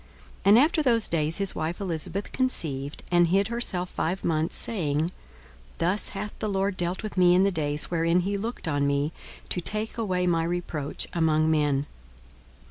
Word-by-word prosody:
42:001:024 - - -27
And 205 +3 +8
after 310 +5 +4
those 235 -6 +3
days 160 -1 0
his 195 -1 +2
wife 160 +2 -3
Elisabeth 180 +1 -3
conceived, 145 - -2
and 175 -1 +5
hid 195 +4 +2
herself 210 -7 -1
five 180 +4 -2
months, 160 -1 0
saying, 155 -10 -1
42:001:025 165 +3 -1 0.7
Thus 185 +5 0
hath 210 +1 -6
the 215 - -2
Lord 195 0 0
dealt 175 +3 -2
with 215 -2 -6
me 180 -1 +6
in 185 - +5
the 200 - +3
days 150 -3 -2
wherein 170 +1 +2
he 200 +3 -1
looked 220 -1 -4
on 145 -2 +1
me, 140 +2 +1 0.4
to 180 - -1
take 215 +5 -3
away 185 -5 0
my 165 -2 +2
reproach 165 -4 -3
among 160 -2 +2
men. 145 -2 +2
175 Hz, 180 wpm, -26 LUFS, 160-200 Hz, 0.7 s, And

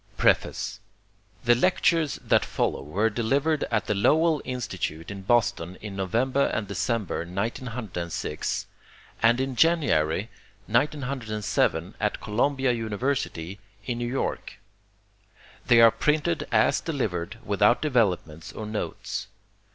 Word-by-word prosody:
Preface - - +1 0.6
The 120 - +5
lectures 165 +2 +2
that - - +3
follow - - -1
were 100 +11 0
delivered 140 +8 +1
at 115 -2 0
the - - 0
Lowell 155 +9 +3
Institute 95 -9 -4
in 100 -1 -7
Boston 95 -5 +1
in 105 -2 -7
November 120 +9 +1
and 105 - -2
December, 100 +1 -1
1906, 100 -1 -3 0.6
and 120 +2 +4
in 130 -1 -2
January, 115 - +2 0.3
1907, 115 - 0
at 105 -1 -1
Columbia 130 +4 +1
University, 110 -5 -2 0.3
in 120 0 -3
New 120 - -2
York. 130 +3 -3 1.1
They 120 - +6
are 115 -1 +8
printed 150 - 0
as - - +3
delivered, 110 - -3
without 105 +3 +3
developments 95 - 0
or 110 - -6
notes. 105 0 -4
115 Hz, 110 wpm, -26 LUFS, 100-130 Hz, 1.1 s, are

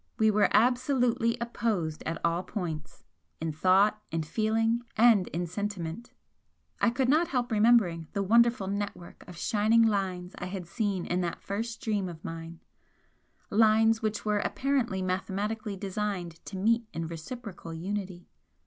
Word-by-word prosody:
We 220 0 +4
were 210 0 +3
absolutely 245 0 +2
opposed 210 -9 -2
at 165 - -2
all 170 +1 +1
points; 170 -6 -6 0.4
in 160 0 -2
thought, 190 +6 +3
in 165 0 -2
feeling 225 +6 +1 0.2
and 220 -5 +5
in 175 +2 -3
sentiment, 190 +2 -4 0.7
I - - +4
could 245 +2 0
not 315 +6 +4
help 250 -2 -1
remembering 210 -7 +3
the 200 - 0
wonderful 235 +1 +4
network 200 -3 -5
of 180 -2 -10
shining 220 +5 +3
lines 190 -4 -1
I - - -4
had 185 -1 -5
seen 195 -1 -2
in 180 +1 0
that 170 -1 -4
first 225 +3 -4
dream 205 -4 -1
of 165 -1 -10
mine, 165 0 -7 0.9
lines 220 +1 +4
which 215 -2 -2
were 210 -1 +2
apparently 245 -6 0
mathematically 200 +3 -2
designed 190 -4 -4
to 195 - -6
meet 230 +4 +2
in 165 - -3
reciprocal 170 +2 -7
unity. 185 +1 -5
205 Hz, 145 wpm, -29 LUFS, 180-225 Hz, 0.9 s, and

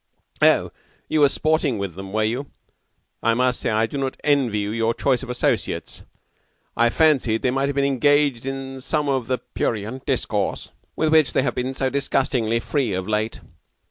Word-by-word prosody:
"Oh, - - +4 0.4
you 155 - +1
were 145 -1 +6
sporting 155 -4 +1
with 100 -3 -4
them, 95 +2 -8
were 110 +1 +1
you? 125 +6 -2 0.7
I 115 0 +2
must 125 0 +1
say - - -1
I 110 0 +2
do 140 +5 -5
not 135 -1 -3
envy 135 -7 +2
you 105 0 -2
your 115 +1 0
choice 130 -3 +1
of 130 - -8
associates. 125 - -2 0.7
I 120 0 +3
fancied 130 -6 +2
they 125 - +2
might 135 +2 0
have 140 - -3
been 140 0 +2
engaged 140 -2 +2
in 135 0 -5
some 150 +2 -1
of 130 -4 0
the 130 - 0
prurient 115 +1 -4
discourse - - -1 0.2
with 155 -1 +1
which 155 -5 +4
they 130 - +2
have 140 - 0
been 130 +1 -3
so 130 0 -1
disgustingly 130 -4 0
free 125 -3 -1
of 95 0 -3
late. 110 +1 -2
130 Hz, 185 wpm, -22 LUFS, 115-140 Hz, 0.7 s, were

